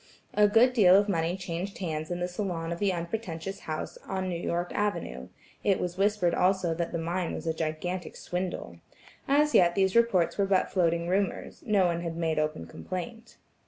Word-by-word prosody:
A 210 Hz, 0 st, +5 dB
good 230 Hz, +5 st, +5 dB
deal 190 Hz, -6 st, +6 dB
of 200 Hz, +1 st, +4 dB
money 170 Hz, -2 st, 0 dB
changed 185 Hz, +1 st, -5 dB
hands 155 Hz, -4 st, -3 dB
in 175 Hz, 0 st, -3 dB
the 180 Hz, -, 0 dB
salon 180 Hz, -3 st, -3 dB
of 170 Hz, -, -4 dB
the 200 Hz, -2 st, +2 dB
unpretentious 175 Hz, 0 st, -4 dB
house 155 Hz, -1 st, -5 dB
on 190 Hz, -1 st, -2 dB
New 170 Hz, -1 st, -3 dB
York 175 Hz, +1 st, -2 dB
Avenue: 65 Hz, -, -2 dB, 0.4 s
it 195 Hz, -2 st, +2 dB
was 175 Hz, -1 st, -3 dB
whispered 195 Hz, -3 st, +2 dB
also 185 Hz, -2 st, +2 dB
that 170 Hz, 0 st, -3 dB
the 170 Hz, -, -2 dB
mine 170 Hz, +2 st, -2 dB
was -, -, -6 dB
a 160 Hz, -, 0 dB
gigantic 165 Hz, +3 st, -3 dB
swindle. 180 Hz, 0 st, -4 dB, 0.5 s
As 300 Hz, +2 st, +3 dB
yet 175 Hz, -1 st, +5 dB
these 190 Hz, 0 st, +2 dB
reports 220 Hz, -7 st, +3 dB
were 200 Hz, -, +3 dB
but 190 Hz, -1 st, +2 dB
floating 170 Hz, -2 st, +1 dB
rumors; 190 Hz, +1 st, -1 dB
no 205 Hz, -3 st, +4 dB
one 170 Hz, -1 st, 0 dB
had 165 Hz, -1 st, -4 dB
made 160 Hz, -2 st, 0 dB
open 155 Hz, 0 st, -2 dB
complaint. 225 Hz, +6 st, -7 dB
180 Hz, 190 wpm, -28 LUFS, 170-195 Hz, 0.5 s, deal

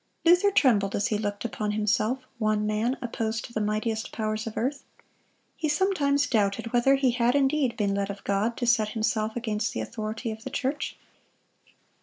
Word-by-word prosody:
Luther 355 Hz, +4 st, +6 dB
trembled 215 Hz, -, +3 dB
as 205 Hz, -, 0 dB
he 210 Hz, -, +1 dB
looked 205 Hz, 0 st, -3 dB
upon 210 Hz, -2 st, -2 dB
himself—one 215 Hz, 0 st, 0 dB
man 215 Hz, +5 st, 0 dB
opposed 225 Hz, -2 st, -2 dB
to 235 Hz, -, -12 dB
the 215 Hz, -, -1 dB
mightiest 215 Hz, +1 st, -1 dB
powers 215 Hz, 0 st, -2 dB
of 220 Hz, -, -6 dB
earth. 270 Hz, +4 st, -1 dB, 0.7 s
He 310 Hz, -, -2 dB
sometimes 295 Hz, -4 st, +2 dB
doubted 215 Hz, -2 st, 0 dB
whether 245 Hz, +3 st, +4 dB
he 270 Hz, -2 st, +2 dB
had 240 Hz, +1 st, +2 dB
indeed 275 Hz, -2 st, +2 dB
been 200 Hz, -2 st, +1 dB
led 200 Hz, 0 st, -1 dB
of 200 Hz, 0 st, -7 dB
God 205 Hz, +4 st, 0 dB
to 245 Hz, -, -1 dB
set 230 Hz, -3 st, +3 dB
himself 220 Hz, 0 st, 0 dB
against 220 Hz, -3 st, -2 dB
the -, -, -2 dB
authority 220 Hz, +1 st, -4 dB
of 220 Hz, 0 st, -8 dB
the -, -, -5 dB
church. 275 Hz, +2 st, -2 dB
225 Hz, 175 wpm, -27 LUFS, 215-260 Hz, 0.7 s, Luther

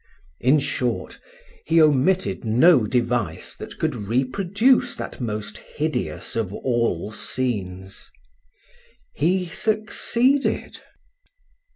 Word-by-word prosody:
In 130 Hz, +5 st, +4 dB
short, 125 Hz, -4 st, -2 dB, 0.4 s
he 165 Hz, -, +3 dB
omitted 150 Hz, -, +3 dB
no 120 Hz, +2 st, +5 dB
device 120 Hz, -2 st, -1 dB
that -, -, -9 dB
could -, -, 0 dB
reproduce 190 Hz, -, +1 dB
that -, -, -7 dB
most 105 Hz, -2 st, -4 dB
hideous 155 Hz, +1 st, -3 dB
of 110 Hz, -5 st, -1 dB
all 115 Hz, -5 st, -1 dB
scenes. 95 Hz, -7 st, -4 dB, 1.0 s
He 180 Hz, +5 st, +1 dB
succeeded. 230 Hz, +7 st, 0 dB
130 Hz, 85 wpm, -23 LUFS, 110-180 Hz, 1.0 s, no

